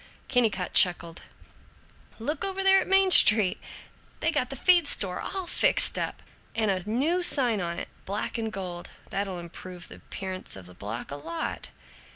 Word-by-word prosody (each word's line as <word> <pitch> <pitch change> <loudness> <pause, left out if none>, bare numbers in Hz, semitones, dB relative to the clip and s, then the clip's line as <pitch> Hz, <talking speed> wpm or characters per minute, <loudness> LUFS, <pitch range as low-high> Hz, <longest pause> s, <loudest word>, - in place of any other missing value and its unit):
Kennicott 220 -8 0
chuckled, 170 -2 +4 1.0
"Look 285 +7 -4
over 390 0 -2
there 385 0 +5
on - - -7
Main 385 0 +4
Street! 210 - +6 0.6
They - - +1
got - - -1
the - - -6
feed 350 -4 +4
store 185 -9 0
all 380 -2 -5
fixed - - +1
up, - - -5 0.3
and 220 -2 +1
a 190 +1 -4
new 300 +11 0
sign 245 - +3
on 170 -1 -4
it, - - -6 0.2
black 205 +4 -4
and 225 -1 -4
gold. 180 -3 -7 0.2
That'll 195 -2 -3
improve 175 +1 -10
the - - -11
appearance 185 -1 -7
of 95 -2 -11
the 90 - -14
block 105 +8 -8
a 140 - -6
lot." 325 - -6
205 Hz, 170 wpm, -26 LUFS, -, 1.0 s, Street